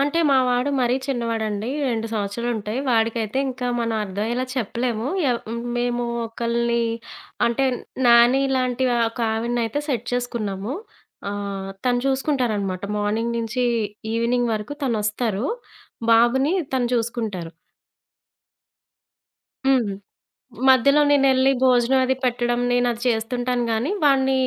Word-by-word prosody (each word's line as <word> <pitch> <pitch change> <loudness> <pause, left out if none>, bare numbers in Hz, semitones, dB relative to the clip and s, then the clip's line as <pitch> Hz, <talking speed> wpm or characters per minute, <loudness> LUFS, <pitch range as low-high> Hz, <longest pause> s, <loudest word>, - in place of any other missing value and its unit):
అంటే, 290 +4 +1
మా 270 - +5
వాడు 250 +3 +1
మరీ 245 0 +2
చిన్నవాడండి 225 -4 -2 0.2
2 225 -2 -1
సంవత్సరాలుంటయి. 220 +2 -2
వాడికైతే 225 0 +1
ఇంకా 250 -1 -4
మనం 230 -1 -1
అర్థమయ్యేలా 220 +6 -2
చెప్పలేము. 235 0 -2 0.2
ఎవ్ 235 - -1
హ్మ్. 235 +1 -4 0.2
మేము 240 0 0 0.2
ఒకల్ని 235 +1 0 0.6
అంటే, 235 +3 +1 0.4
నాని 240 +3 +6
లాంటి 255 0 0
ఆ! - - +1
ఒక 235 - -8
ఆవిడని 235 +2 -1
అయితే 230 +6 -2
సెట్ 245 -4 -2
చేసుకున్నాము. 230 -2 -3 0.6
ఆహ్, 200 -1 -4
తను 245 -1 +2
చూసుకుంటారనమాట 235 - 0
మార్నింగ్ 225 +3 -1
నుంచి 230 +2 -1 0.5
ఈవినింగ్ 235 +1 +1
వరకు. 215 +6 -5
తనొస్తారు, 215 -1 -1 0.7
బాబుని 265 +7 +4 0.2
తను 250 -2 +1
చూసుకుంటారు. 220 -7 -3 2.1
హ్మ్. 255 -6 +3 0.8
మధ్యలో 275 +3 +5
నేనెళ్లి 270 -2 +4
భోజనం 255 0 +4
అది 260 +1 +1
పెట్టడం 240 -1 0
నేనది 245 -1 +1
చేస్తుంటాను 245 +2 0
గానీ, 225 +6 0
వాడిని 270 -2 +4
235 Hz, 115 wpm, -22 LUFS, 225-255 Hz, 2.1 s, నాని